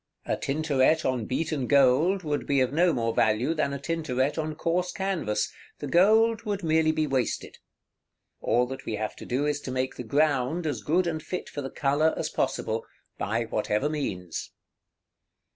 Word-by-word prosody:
A -, -, 0 dB
Tintoret 145 Hz, 0 st, +1 dB
on 125 Hz, -4 st, 0 dB
beaten 145 Hz, -1 st, -1 dB
gold 145 Hz, +8 st, +4 dB
would 150 Hz, -2 st, -2 dB
be 140 Hz, -1 st, +2 dB
of 130 Hz, +1 st, +1 dB
no 175 Hz, +3 st, +4 dB
more 115 Hz, -5 st, 0 dB
value 115 Hz, +8 st, +2 dB
than 155 Hz, -3 st, 0 dB
a 140 Hz, -, -3 dB
Tintoret 140 Hz, -3 st, -1 dB
on 155 Hz, -1 st, -3 dB
coarse 175 Hz, +3 st, 0 dB
canvas; 190 Hz, -, -1 dB, 0.2 s
the -, -, -6 dB
gold 220 Hz, +5 st, +4 dB
would 205 Hz, -3 st, -3 dB
merely 160 Hz, -1 st, +3 dB
be 155 Hz, 0 st, 0 dB
wasted. 130 Hz, -5 st, -2 dB, 0.8 s
All 125 Hz, +1 st, +2 dB
that 135 Hz, +1 st, -7 dB
we 110 Hz, -, -1 dB
have 110 Hz, 0 st, -3 dB
to -, -, -9 dB
do 130 Hz, +4 st, 0 dB
is 145 Hz, -1 st, -1 dB
to -, -, -6 dB
make 130 Hz, 0 st, -2 dB
the -, -, -4 dB
ground 145 Hz, +4 st, +1 dB
as 145 Hz, -7 st, -2 dB
good 175 Hz, +4 st, +2 dB
and 160 Hz, -2 st, -2 dB
fit 180 Hz, +3 st, -5 dB
for 145 Hz, -, -5 dB
the 135 Hz, -, -5 dB
color 145 Hz, +4 st, +1 dB
as -, -, -2 dB
possible, 110 Hz, +1 st, -1 dB, 0.4 s
by 115 Hz, +4 st, 0 dB
whatever 110 Hz, +4 st, -1 dB
means. 95 Hz, -, -4 dB
145 Hz, 175 wpm, -27 LUFS, 125-160 Hz, 0.8 s, gold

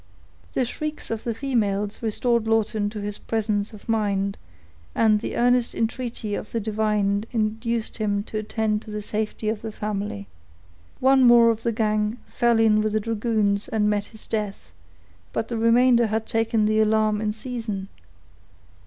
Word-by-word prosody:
The 255 Hz, -, +2 dB
shrieks 305 Hz, +4 st, -5 dB
of 225 Hz, -1 st, -4 dB
the 235 Hz, -, 0 dB
females 210 Hz, -5 st, -1 dB
restored 235 Hz, 0 st, 0 dB
Lawton 220 Hz, -1 st, +1 dB
to 210 Hz, 0 st, -6 dB
his 205 Hz, 0 st, -4 dB
presence 210 Hz, -2 st, -1 dB
of 210 Hz, -2 st, -13 dB
mind, 200 Hz, -3 st, 0 dB, 0.6 s
and 215 Hz, -2 st, +4 dB
the -, -, -4 dB
earnest 245 Hz, 0 st, +2 dB
entreaty 230 Hz, -2 st, -3 dB
of 210 Hz, -, -5 dB
the 230 Hz, -, -1 dB
divine 210 Hz, -1 st, 0 dB
induced 225 Hz, 0 st, -1 dB
him 205 Hz, -2 st, 0 dB
to 215 Hz, 0 st, -4 dB
attend 215 Hz, 0 st, -1 dB
to -, -, -13 dB
the 210 Hz, 0 st, -4 dB
safety 215 Hz, +1 st, -3 dB
of 215 Hz, 0 st, -1 dB
the 220 Hz, -, -5 dB
family. 205 Hz, -, -4 dB, 0.7 s
One 265 Hz, 0 st, +5 dB
more 240 Hz, -1 st, +7 dB
of 225 Hz, 0 st, -4 dB
the 235 Hz, -, 0 dB
gang 215 Hz, 0 st, 0 dB
fell 235 Hz, -1 st, +2 dB
in 215 Hz, -1 st, +4 dB
with 215 Hz, 0 st, -1 dB
the 215 Hz, -, +2 dB
dragoons, 215 Hz, -2 st, 0 dB
and 210 Hz, -1 st, +1 dB
met 205 Hz, -1 st, 0 dB
his 220 Hz, -, -12 dB
death; 210 Hz, -3 st, -4 dB, 0.6 s
but 225 Hz, -, -2 dB
the 235 Hz, -, -2 dB
remainder 235 Hz, +1 st, +5 dB
had 220 Hz, +1 st, -1 dB
taken 225 Hz, -1 st, +1 dB
the 215 Hz, 0 st, +2 dB
alarm 215 Hz, -1 st, +2 dB
in 215 Hz, -1 st, 0 dB
season. 220 Hz, -4 st, -4 dB
220 Hz, 165 wpm, -24 LUFS, 210-230 Hz, 0.7 s, more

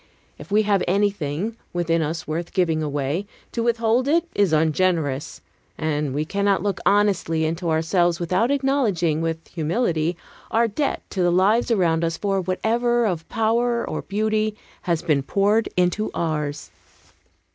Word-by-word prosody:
If -, -, -11 dB
we 215 Hz, +1 st, +4 dB
have 200 Hz, -2 st, +2 dB
anything, 200 Hz, +1 st, 0 dB, 0.2 s
within 165 Hz, -1 st, +1 dB
us 160 Hz, +2 st, -3 dB
worth 165 Hz, +3 st, -4 dB
giving 165 Hz, -4 st, +1 dB
away, 145 Hz, +5 st, -2 dB, 0.2 s
to 235 Hz, -, -2 dB
withhold 235 Hz, +2 st, +1 dB
it 335 Hz, +3 st, +3 dB
is 200 Hz, -4 st, +2 dB
ungenerous; 160 Hz, -2 st, 0 dB, 0.4 s
and 150 Hz, -3 st, -1 dB
we 150 Hz, +1 st, 0 dB
cannot 200 Hz, 0 st, +1 dB
look 200 Hz, -2 st, -1 dB
honestly 195 Hz, -6 st, +2 dB
into 165 Hz, +2 st, -2 dB
ourselves 170 Hz, +2 st, +1 dB
without 185 Hz, +7 st, +1 dB
acknowledging 235 Hz, -, +1 dB
with 165 Hz, 0 st, -3 dB
humility 170 Hz, -1 st, -1 dB, 0.3 s
our 230 Hz, +1 st, +2 dB
debt 275 Hz, +7 st, -2 dB
to 190 Hz, -, -2 dB
the 175 Hz, 0 st, +3 dB
lives 205 Hz, +8 st, +3 dB
around 170 Hz, -7 st, +2 dB
us 165 Hz, 0 st, -1 dB
for 195 Hz, -2 st, 0 dB
whatever 235 Hz, +6 st, +1 dB
of 170 Hz, -6 st, -2 dB
power 235 Hz, +2 st, +1 dB
or -, -, -3 dB
beauty 215 Hz, +1 st, -1 dB, 0.3 s
has 170 Hz, -2 st, -1 dB
been 150 Hz, -5 st, +2 dB
poured 205 Hz, +9 st, +1 dB
into 180 Hz, +4 st, +1 dB
ours. 150 Hz, -3 st, -2 dB
180 Hz, 145 wpm, -23 LUFS, 160-215 Hz, 0.4 s, we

